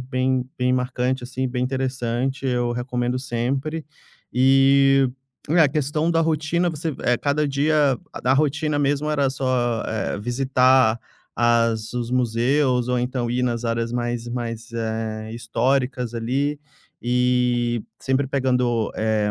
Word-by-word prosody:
bem 130 Hz, 0 st, 0 dB
bem 125 Hz, 0 st, +2 dB
marcante, 125 Hz, 0 st, -1 dB
assim, 130 Hz, +1 st, -3 dB
bem 125 Hz, 0 st, -2 dB
interessante, 130 Hz, 0 st, -2 dB
eu 120 Hz, -1 st, 0 dB
recomendo 125 Hz, 0 st, -2 dB
sempre. 135 Hz, +6 st, -2 dB, 0.5 s
E 135 Hz, +1 st, +4 dB, 0.4 s
é, 170 Hz, -, +3 dB
a 150 Hz, -, +6 dB
questão 150 Hz, +3 st, 0 dB
da 165 Hz, -, +2 dB
rotina, 165 Hz, +2 st, +1 dB
você 155 Hz, -1 st, -4 dB, 0.3 s
cada 150 Hz, +1 st, +1 dB
dia 145 Hz, -1 st, +2 dB
a 125 Hz, -, 0 dB
rotina 150 Hz, +1 st, +1 dB
mesmo 145 Hz, +1 st, 0 dB
era 140 Hz, -2 st, +2 dB
só, 125 Hz, -4 st, 0 dB
eh, 110 Hz, -2 st, -2 dB
visitar 125 Hz, 0 st, +3 dB, 0.4 s
as 115 Hz, -2 st, +2 dB
os 120 Hz, -1 st, -3 dB
museus 125 Hz, +1 st, +1 dB
ou 125 Hz, 0 st, +1 dB
então 125 Hz, -1 st, -2 dB
ir 125 Hz, +1 st, 0 dB
nas 120 Hz, -1 st, -1 dB
áreas 115 Hz, 0 st, -1 dB
mais 120 Hz, -1 st, -2 dB
mais, 115 Hz, -1 st, -5 dB
eh, 110 Hz, -1 st, -3 dB
históricas 125 Hz, +1 st, -1 dB
ali, 135 Hz, +6 st, -1 dB, 0.4 s
e 125 Hz, -1 st, +1 dB, 0.2 s
sempre 135 Hz, +1 st, 0 dB
pegando, 125 Hz, -4 st, 0 dB
eh, 110 Hz, -1 st, +1 dB
125 Hz, 130 wpm, -22 LUFS, 120-135 Hz, 0.5 s, a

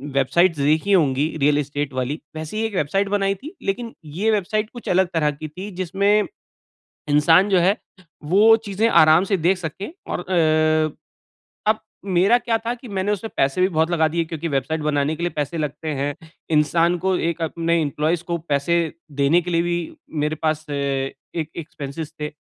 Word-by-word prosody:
Websites 160 Hz, +6 st, +3 dB
देखी 155 Hz, +7 st, +2 dB
होंगी 145 Hz, -7 st, +3 dB, 0.2 s
real 145 Hz, +1 st, +4 dB
estate 145 Hz, -1 st, -2 dB
वाली 130 Hz, +4 st, -2 dB, 0.2 s
वैसे 155 Hz, +6 st, -5 dB
ही 220 Hz, -, 0 dB
एक 220 Hz, -, -4 dB
वेबसाइट 195 Hz, +5 st, 0 dB
बनाई 195 Hz, -1 st, +1 dB
थी 300 Hz, -, -11 dB
लेक़िन 230 Hz, +4 st, -3 dB, 0.2 s
ये 220 Hz, +4 st, +2 dB
वेबसाइट 215 Hz, +1 st, 0 dB
कुछ 240 Hz, -1 st, -11 dB
अलग 185 Hz, +1 st, +3 dB
तरह 155 Hz, -3 st, +2 dB
की 150 Hz, +2 st, -7 dB
थी 185 Hz, +7 st, -8 dB
जिसमें 200 Hz, +3 st, +2 dB, 0.9 s
इंसान 165 Hz, +7 st, +5 dB
जो 190 Hz, -2 st, +4 dB
है 190 Hz, +4 st, +3 dB, 0.6 s
वो 220 Hz, +3 st, +7 dB
चीज़ें 205 Hz, +3 st, +1 dB
आराम 155 Hz, 0 st, +6 dB
से 195 Hz, 0 st, 0 dB
देख 175 Hz, +4 st, +2 dB
सके 180 Hz, -, -6 dB, 0.2 s
और -, -, -1 dB
अ, 155 Hz, -3 st, +2 dB, 0.7 s
अब 220 Hz, -, -3 dB, 0.4 s
मेरा 200 Hz, +7 st, +5 dB
क्या 235 Hz, -2 st, 0 dB
था 235 Hz, -, 0 dB
कि 245 Hz, 0 st, -11 dB
मैंने 200 Hz, 0 st, -1 dB
उससे 210 Hz, +2 st, -2 dB
पैसे 140 Hz, -1 st, 0 dB
भी 185 Hz, -, +5 dB
बहुत 160 Hz, -1 st, +1 dB
लगा 160 Hz, -2 st, +3 dB
दिए 165 Hz, +1 st, -1 dB
क्योंकि 165 Hz, 0 st, -4 dB
वेबसाइट 150 Hz, +2 st, -1 dB
बनाने 150 Hz, 0 st, 0 dB
के 170 Hz, -, -6 dB
लिए 175 Hz, -, +1 dB
पैसे 150 Hz, +2 st, -2 dB
लगते 150 Hz, +1 st, -4 dB
हैं। 145 Hz, +1 st, -1 dB, 0.4 s
इंसान 165 Hz, +3 st, +3 dB
को 185 Hz, +2 st, 0 dB
एक 170 Hz, 0 st, -5 dB
अपने 165 Hz, +1 st, 0 dB
इम्प्लॉइज 155 Hz, +3 st, 0 dB
को 170 Hz, -, 0 dB
पैसे 140 Hz, +4 st, +2 dB, 0.5 s
देने 160 Hz, +6 st, +4 dB
के 175 Hz, +1 st, -5 dB
लिए 170 Hz, 0 st, +2 dB
भी 175 Hz, 0 st, 0 dB, 0.5 s
मेरे 155 Hz, +1 st, -1 dB
पास 155 Hz, 0 st, 0 dB
अ, -, -, -3 dB
एक 140 Hz, +3 st, -3 dB
एक्सपेंसेस 155 Hz, -1 st, -6 dB
थे। 150 Hz, 0 st, -3 dB
165 Hz, 185 wpm, -22 LUFS, 150-190 Hz, 0.9 s, वो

